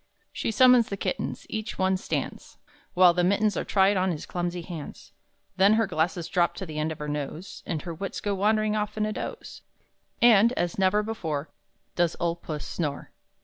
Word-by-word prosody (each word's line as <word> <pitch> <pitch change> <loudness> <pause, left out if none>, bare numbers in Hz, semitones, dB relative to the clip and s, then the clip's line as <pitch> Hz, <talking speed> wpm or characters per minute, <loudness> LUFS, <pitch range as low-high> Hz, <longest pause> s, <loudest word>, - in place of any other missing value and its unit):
She - - -2
summons 250 +1 +5
the 200 - -4
kittens; - - -3
each 220 -1 -5
one 190 0 +2
stands 185 - -4 0.4
While 180 -1 +7
the 175 0 +1
mittens 200 +3 +2
are - - -1
tried 195 0 +3
on 185 +1 +1
his 160 -4 -4
clumsy 175 0 -3
hands; 165 -4 -9 0.5
Then 195 +3 +6
her 225 +1 +3
glasses 170 -1 -1
drop 175 -2 +1
to 190 - -5
the 155 -2 -5
end 155 +1 -1
of 155 - -6
her 150 - -5
nose, 150 +5 -5
And 160 -3 -3
her 170 - -5
wits 195 +4 -5
go 205 - -1
wandering 215 +2 +1
off 210 0 -2
in 215 - +1
a 215 - -2
doze, 470 - -7 0.6
And 235 0 +6
as 175 -5 -2
never 195 +2 +3
before, 165 -9 -4 0.4
Does 175 -2 +1
old 170 0 -1
Puss 150 -2 -5
snore! 150 -4 -4
185 Hz, 190 wpm, -26 LUFS, 170-210 Hz, 0.6 s, While